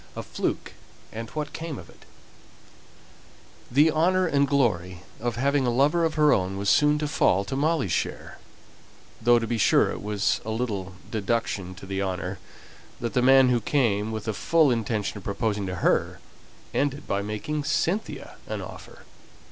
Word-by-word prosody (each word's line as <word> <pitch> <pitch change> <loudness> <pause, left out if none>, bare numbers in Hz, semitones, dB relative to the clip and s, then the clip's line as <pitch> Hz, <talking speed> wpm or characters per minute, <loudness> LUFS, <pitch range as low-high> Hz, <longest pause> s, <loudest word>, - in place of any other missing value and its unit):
A - - -5
FLUKE, - - -3 0.4
AND 115 0 -6
WHAT 150 +2 -5
CAME 160 -4 -5
OF - - -10
IT. - - -19
[Illustration - - -26
(untitled)] - - -12
The 150 +3 +6
honour 185 +4 +2
and 140 -4 +2
glory 95 -11 0 0.2
of 120 0 -2
having 135 +1 +1
a - - +3
lover 145 +8 +2
of 160 - -1
her 150 -1 +5
own 95 0 -1
was 100 -1 +1
soon 150 +5 +4
to 150 0 -2
fall 100 -8 +2
to 135 - -4
Molly's 145 - +1
share; - - -3 0.8
though, 120 +1 +5
to 115 - -1
be 115 0 -2
sure, - - +4
it - - -6
was 105 0 0
a 110 - -6
little 105 -5 -3 0.2
deduction 105 -4 -2
from 95 +1 -11
the 95 0 -2
honour 95 0 -3 0.6
that 120 -1 -3
the 125 - +2
man 135 0 +6
who 120 -2 +2
came 110 -5 +1
with 110 -1 -4
the 110 - -2
full 155 +5 +3
intention 110 -3 -2
of - - -15
proposing 105 -1 -2
to 95 - -3
her, - - +1 0.5
ended 145 0 -1
by 100 - 0
making 105 +9 -3
Cynthia 170 +8 -2
an - - -4
offer. - - -11
120 Hz, 180 wpm, -25 LUFS, 100-145 Hz, 0.8 s, The